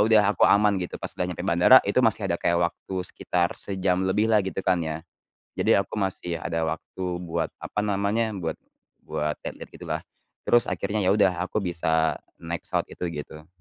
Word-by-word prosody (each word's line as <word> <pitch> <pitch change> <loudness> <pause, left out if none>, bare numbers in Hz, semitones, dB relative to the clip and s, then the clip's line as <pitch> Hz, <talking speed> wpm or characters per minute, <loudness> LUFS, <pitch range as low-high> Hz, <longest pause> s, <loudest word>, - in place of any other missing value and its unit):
udah 110 -1 +5
aku - - -2
aman 100 -1 +4
gitu 90 - -5
pas - - -4
udah - - -2
nyampe 90 0 -5
bandara 95 +8 +7
itu 100 +5 +3
masih 110 -3 +2
ada 85 - -2
kayak 85 - +2
waktu 90 +2 -5
sekitar 90 -1 -1
sejam 95 -2 0
lebihlah 105 +3 +3
gitu 95 - -5
kan 90 -2 +2
ya. 80 0 -4 0.5
Jadi - - +4
aku 100 - -3
masih 90 -3 -2
ada 80 +1 -1
waktu 85 +3 -5 0.2
buat 85 -2 -3
apa - - -3
namanya, 105 +2 0
buat 85 -4 -3 0.5
buat 75 0 -2
lihat-lihat - - -7
gitulah. - - -4 0.5
Terus 120 0 +5
akhirnya 105 +1 -2
ya 95 - +4
udah 100 -3 +4
aku 100 +4 -2
bisa 80 -3 +1 0.2
naik 85 0 -5
pesawat - - -1
itu - - -6 0.2
gitu. 75 +1 -13
95 Hz, 180 wpm, -25 LUFS, 85-100 Hz, 0.5 s, bandara